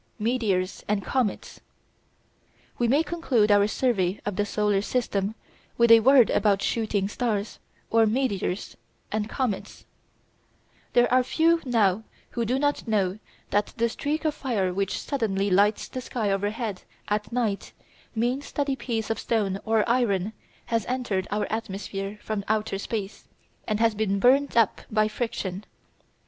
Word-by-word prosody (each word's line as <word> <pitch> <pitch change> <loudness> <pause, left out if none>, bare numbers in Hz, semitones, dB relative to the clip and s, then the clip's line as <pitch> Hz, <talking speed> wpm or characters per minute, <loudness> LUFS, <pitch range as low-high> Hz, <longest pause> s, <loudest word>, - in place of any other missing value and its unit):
METEORS 210 -5 0
AND 205 -1 0
COMETS 250 -7 -1 1.2
We 240 - +2
may 280 +7 +3
conclude 265 -12 +1
our 205 0 +5
survey 210 -6 0
of 205 -2 -2
the 205 +2 0
solar 210 -1 +1
system 210 -3 -1 0.4
with 235 -1 +5
a 230 - +10
word 255 +1 +6
about 200 -2 +2
"shooting 215 -4 0
stars," 210 -1 -2 0.3
or 225 -1 +5
meteors, 210 -5 -1 0.4
and 215 0 -1
comets. 245 -7 -3 1.1
There 240 0 +5
are 255 - +6
few 330 +6 +2
now 220 -5 +2 0.3
who 235 -1 -1
do 250 +4 +1
not 290 -2 0
know 200 -2 0 0.3
that 205 0 +1
the 235 0 +2
streak 300 +7 -3
of 310 - +2
fire 215 -11 -1
which 195 0 -1
suddenly 205 -8 -1
lights 205 +3 +3
the 255 - -6
sky 225 -4 -2
overhead 205 +1 -2 0.3
at 210 +1 -1
night 230 -5 -1 0.4
means 245 +5 -1
that 285 -1 0
a - - 0
piece 225 -4 -3
of 225 - -2
stone 200 -4 0
or 220 -1 +2
iron 220 -5 +1 0.3
has 230 -1 0
entered 240 -7 -1
our 210 +1 0
atmosphere 200 -2 -4
from 215 -2 -3
outer 215 -2 0
space, 205 -1 -5 0.4
and 215 -1 0
has 230 -1 +3
been 205 -2 0
burned 260 +4 +3
up 230 -4 +3
by 215 0 +2
friction. 210 -4 -4
220 Hz, 150 wpm, -26 LUFS, 200-245 Hz, 1.2 s, a